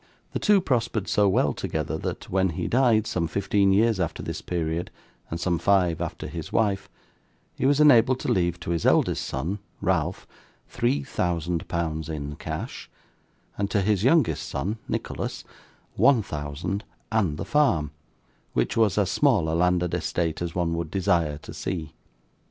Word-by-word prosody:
The - - -1
two 205 -2 +4
prospered 115 - 0
so 105 -1 +3
well 75 -7 +2
together - - -3
that, - - -5
when 95 0 +1
he - - -2
died, 120 -4 +3
some 85 -5 -1
fifteen 100 +2 +2
years 110 +1 +3
after 85 -3 -2
this - - -4
period, 85 0 -2 0.4
and 85 - -4
some 85 -1 0
five 90 -4 +2
after 85 - -4
his - - -6
wife, 100 -2 +1 0.6
he - - 0
was 145 +1 +3
enabled 130 -4 +6
to - - -1
leave, 85 -1 +1
to 85 - -3
his 85 -2 -1
eldest - - +3
son, 85 +10 -3 0.2
Ralph, 90 -6 0 0.4
three 125 +4 0
thousand 85 - -2
pounds 80 -2 -2
in 75 -2 -4
cash, - - -6 0.7
and 100 -1 0
to 105 - +1
his 105 -1 +1
youngest 150 +5 +3
son, 105 +4 -3
Nicholas, - - -4 0.5
one 130 -6 +4
thousand 80 +6 -4 0.3
and 95 -9 +1
the - - -4
farm, 85 - +2 0.6
which - - 0
was 110 -3 +3
as 100 -3 +2
small 120 - +3
a - - -1
landed 90 0 +2
estate 85 -2 -1
as 85 -1 -3
one 85 -2 0
would 85 -1 -3
desire 85 -5 +1
to 75 - -11
see. 85 -5 -4
95 Hz, 165 wpm, -25 LUFS, 85-110 Hz, 0.7 s, enabled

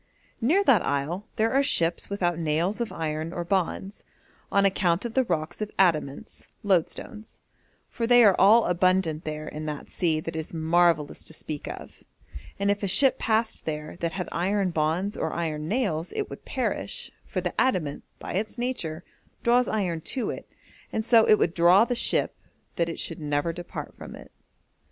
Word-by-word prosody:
'Near 330 - +3
that 255 - +4
isle 155 +9 -2
there 225 +2 +1
are 275 - +4
ships 170 -11 +1
without 175 -4 -1
nails 170 +7 0
of 235 - -2
iron 160 0 -3
or 175 -1 -4
bonds, 190 +2 -2 0.5
on 200 0 +3
account 185 0 +1
of 235 - -4
the 260 - +3
rocks 160 -2 -3
of 210 - -2
adamants 155 -7 0 0.2
(loadstones), 205 +3 -2 0.5
for 230 -2 -3
they 245 0 +7
are 200 -4 +6
all 215 +5 +6
abundant 180 -2 +1
there 155 0 -5
in 155 +1 -6
that 150 -1 -6
sea 165 -4 0
that 165 +1 -6
it - - -2
is 160 +1 -6
marvellous 165 -1 +2
to - - -8
speak 155 -1 -6
of, - - -9 0.6
and 200 0 +1
if 205 - -2
a 200 - -1
ship 265 +8 +4
passed 220 0 0
there 150 -1 -4
that 170 -1 -2
had 180 -1 -4
iron 190 +2 0
bonds 165 +6 0
or - - -2
iron 155 -2 -3
nails 180 -7 -1
it 425 - -3
would - - -9
perish, - - -3 0.2
for - - -2
the - - -3
adamant, 180 - 0
by - - -7
its 215 +6 -2
nature, 180 -10 -3 0.4
draws 245 +1 +4
iron 180 -7 -1
to 250 - -2
it, - - -9 0.4
and 220 - -2
so 230 -2 +5
it 215 - +7
would 165 - +1
draw 180 +5 +6
the 245 - -1
ship 240 - +2 0.4
that 170 -1 0
it 165 - -5
should 165 - -3
never 150 +2 -1
depart 175 0 -7
from - - -10
it.' - - -13
180 Hz, 185 wpm, -26 LUFS, 160-215 Hz, 0.6 s, they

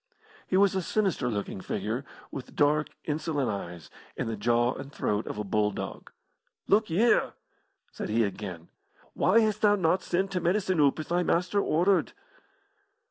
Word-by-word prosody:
He 185 - +1
was 200 -1 +4
a 190 - 0
sinister 190 -7 0
looking 100 -3 -4
figure, 110 +8 -3 0.3
with 135 - -8
dark, 150 +1 +3 0.2
insolent 150 -4 -1
eyes, 85 -5 -7 0.3
and - - -2
the 115 - -2
jaw 120 +3 +2
and 135 +1 -8
throat 105 -5 -1
of - - -5
a 105 - -2
bulldog. 105 0 -2 0.5
"Look 215 +1 +3
y'ere!" 215 +9 +3 0.6
said - - -6
he 115 +2 +2
again. 95 -5 -5 0.4
"Why 225 +5 +4
hast 215 -1 0
thou 205 -1 +5
not 185 -1 +2
sent 190 +2 -1
t' 185 - 0
medicine 185 0 +1
oop 140 -2 +4
as 155 - -6
thy 175 +1 +2
master 180 +3 +1
ordered?" 180 +4 +2
155 Hz, 160 wpm, -28 LUFS, -, 0.6 s, thou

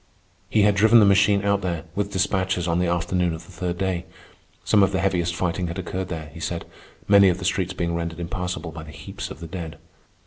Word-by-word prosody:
He 110 -2 +3
had 105 0 +5
driven 110 +3 +6
the 105 - +6
machine 100 0 +4
out 100 0 +2
there, 85 -4 -2
with 100 +1 -2
despatches, 95 -2 0
on 85 0 +1
the 90 - +1
afternoon 85 0 0
of 80 - -11
the - - -15
third 90 0 -3
day. 95 -2 -1 0.6
Some 105 - +4
of 95 0 +4
the 95 - +1
heaviest 90 -3 0
fighting 90 0 -1
had 85 +2 -5
occurred 95 0 -4
there, 80 -4 -6
he 85 - -10
said, 85 +1 -3 0.4
many 100 -1 +7
of 90 - 0
the 90 - -6
streets 95 -1 0
being 85 -2 -2
rendered 85 0 -3
impassable 90 -1 -4
by 80 0 -8
the 75 - -11
heaps 70 -1 -7
of - - -10
the 85 - -6
dead. 80 -3 -6
90 Hz, 230 wpm, -24 LUFS, 85-95 Hz, 0.6 s, many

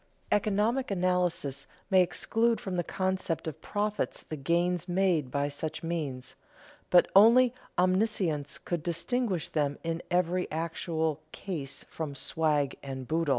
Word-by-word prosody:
Economic 215 +5 +1
analysis 180 -7 0 0.2
may 190 -1 +7
exclude 225 +6 +2
from 190 -2 -4
the 175 - 0
concept 185 -3 -2
of 160 -3 -6
profits 210 0 -2
the 155 - -3
gains 170 +4 0
made 175 -6 +2
by 140 +2 0
such 155 +3 -5
means, 145 -7 -3 0.6
but 180 - +6
only 235 +5 +7 0.2
omniscience 185 -6 +1
could 175 -3 -3
distinguish 180 +2 -1
them 145 -2 0
in 165 0 -2
every 180 0 +1
actual 160 -1 -2
case 155 -9 -5
from 155 -3 -5
"swag 150 -1 +1
and 130 -2 -6
boodle." 165 -1 0
170 Hz, 130 wpm, -29 LUFS, 150-190 Hz, 0.6 s, may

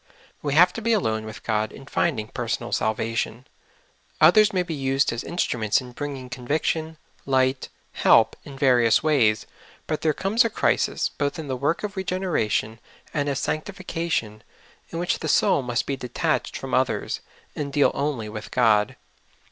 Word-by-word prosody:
We 145 -1 -1
have 180 +3 +6
to 230 - -5
be 230 +1 +2
alone 110 - 0
with 110 +1 -9
God 110 -1 0
in 135 - -12
finding 130 -6 -1
personal - - -3
salvation. 115 +2 -1 0.7
Others 210 +7 +6
may 185 -2 +1
be 175 - -5
used 135 -2 +1
as 115 - -4
instruments 115 - 0
in 125 -2 -9
bring 145 +2 -5
ing 130 -1 -9
conviction, 155 +5 -2 0.3
light, 130 0 +1 0.2
help - - +4
in 140 -1 -10
various 125 -5 +4
ways; 125 -9 +3 0.4
but 155 - -2
there 160 - +3
comes 210 +5 +2
a 230 - 0
crisis, - - +1
both 145 +2 -2
in 160 -2 -6
the 130 - -2
work 145 +9 -1
of 210 -1 -4
regeneration 180 - -1 0.3
and 145 -1 0
of 140 - -1
sanctification, 165 - -3 0.5
in 165 - -6
which 175 +1 0
the 160 - -4
soul 145 - +3
must 120 -1 -1
be 140 - -2
detached 125 -2 -2
from - - -7
others, - - 0 0.4
and 145 -2 -4
deal 145 +1 +3
only 140 -6 -2
with 110 0 -7
God. 105 -4 +3
140 Hz, 165 wpm, -24 LUFS, 115-160 Hz, 0.7 s, have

